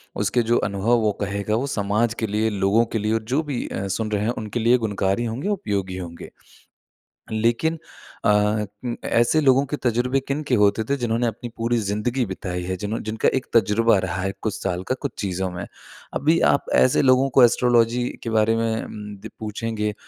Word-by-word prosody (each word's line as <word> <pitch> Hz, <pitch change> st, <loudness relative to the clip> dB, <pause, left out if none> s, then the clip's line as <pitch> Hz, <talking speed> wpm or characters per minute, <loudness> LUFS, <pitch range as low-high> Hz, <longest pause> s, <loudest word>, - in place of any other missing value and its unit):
उसके 105 Hz, +4 st, +1 dB
जो 115 Hz, +1 st, +2 dB
अनुभव 100 Hz, +4 st, +1 dB
वो 110 Hz, -2 st, +2 dB
कहेगा 100 Hz, +1 st, -1 dB
वो 130 Hz, +5 st, -1 dB
समाज 110 Hz, 0 st, 0 dB
के 110 Hz, -, -1 dB
लिए, 110 Hz, +2 st, 0 dB
लोगों 100 Hz, +3 st, +2 dB
के 115 Hz, 0 st, -3 dB
लिए 105 Hz, +1 st, 0 dB
और 110 Hz, 0 st, 0 dB
जो 145 Hz, -, +3 dB
भी 140 Hz, -5 st, -3 dB
अ, 100 Hz, +1 st, -4 dB
सुन 110 Hz, +3 st, -2 dB
रहे 105 Hz, -1 st, 0 dB
हैं 115 Hz, -, +1 dB
उनके 110 Hz, +2 st, -3 dB
लिए 120 Hz, +2 st, +4 dB
गुणकारी 100 Hz, -1 st, -1 dB
होंगे, 115 Hz, -, -3 dB
उपयोगी 100 Hz, -, -2 dB
होंगे। 85 Hz, -2 st, -8 dB, 1.0 s
लेकिन 115 Hz, +9 st, +1 dB, 0.5 s
अ -, -, +4 dB, 0.6 s
उं, 120 Hz, -1 st, -2 dB
ऐसे 120 Hz, +7 st, +3 dB
लोगों 135 Hz, -1 st, +4 dB
के 150 Hz, -, -1 dB
तज़ुर्बे 125 Hz, +2 st, +1 dB
किनके 140 Hz, -1 st, 0 dB
होते 105 Hz, 0 st, +3 dB
थे 140 Hz, -, +2 dB
जिन्होंने 120 Hz, -1 st, 0 dB
अपनी 120 Hz, +2 st, -5 dB
पूरी 115 Hz, +1 st, 0 dB
ज़िंदगी 110 Hz, +4 st, -1 dB
बिताई 90 Hz, -2 st, -5 dB
है 95 Hz, +1 st, -3 dB
जिनहों 105 Hz, +4 st, -3 dB
जिनका 110 Hz, +1 st, +1 dB
एक 130 Hz, -, -3 dB
तज़ुर्बा 115 Hz, +1 st, +4 dB
रहा 90 Hz, 0 st, -3 dB
है 95 Hz, +1 st, -1 dB
कुछ 110 Hz, -, -1 dB
साल 90 Hz, -1 st, -2 dB
का 130 Hz, -, 0 dB
कुछ 140 Hz, -, -2 dB
चीज़ों 95 Hz, -2 st, -2 dB
में। 90 Hz, 0 st, -5 dB, 0.5 s
अभी 160 Hz, +4 st, +2 dB
आप 140 Hz, -, 0 dB
ऐसे 130 Hz, -, +4 dB
लोगों 130 Hz, 0 st, +4 dB
को 130 Hz, -, +9 dB
एस्ट्रोलॉजी 120 Hz, 0 st, +3 dB, 0.2 s
के 115 Hz, -, -3 dB
बारे 110 Hz, 0 st, +3 dB
में 115 Hz, -1 st, -1 dB
उम -, -, -9 dB, 0.3 s
द -, -, -5 dB
पूछेंगे 110 Hz, 0 st, -3 dB
110 Hz, 195 wpm, -23 LUFS, 100-120 Hz, 1.0 s, को